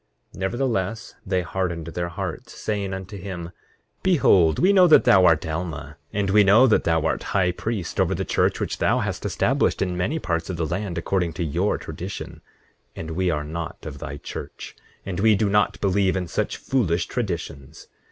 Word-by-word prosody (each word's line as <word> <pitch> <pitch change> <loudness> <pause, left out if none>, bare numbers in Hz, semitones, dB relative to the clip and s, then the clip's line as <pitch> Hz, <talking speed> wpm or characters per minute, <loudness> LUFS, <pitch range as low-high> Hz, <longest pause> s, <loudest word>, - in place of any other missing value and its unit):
8:11 - - -12
Nevertheless, 115 0 -2
they 95 -1 +1
hardened 85 -2 -3
their 85 +1 -3
hearts, 85 - -6
saying 100 -2 -3
unto 95 +2 -6
him: 90 -3 -6 0.5
Behold, 100 - +4
we 190 +3 +4
know 185 -2 +7
that 155 - +7
thou 95 -1 +6
art 80 -3 +4
Alma; 80 -2 -4 0.2
and 100 -1 -1
we 105 +1 +6
know 105 +6 +6
that 115 - +3
thou 80 -1 +2
art 80 - 0 0.2
high 90 -2 +3
priest 100 0 -4
over - - +2
the - - -3
church - - +1
which - - -3
thou - - +2
hast - - -3
established - - +1
in 90 -2 -1
many 90 - -1
parts 85 - -2
of 90 - -3
the 80 - -1
land, 90 +2 -3
according 85 0 -1
to 85 - -3
your 75 -3 0
tradition; - - -7 0.5
and 80 0 -6
we 90 +2 0
are 75 -3 -1
not 80 +2 -6
of - - -7
thy 70 +2 -6
church, - - -8 0.3
and 95 -2 -4
we 110 +1 +5
do 100 0 +1
not 105 0 +2
believe 95 -1 +2
in 90 -2 -2
such - - -2
foolish 90 -10 0
traditions. 85 - -5
95 Hz, 190 wpm, -23 LUFS, 85-100 Hz, 0.5 s, know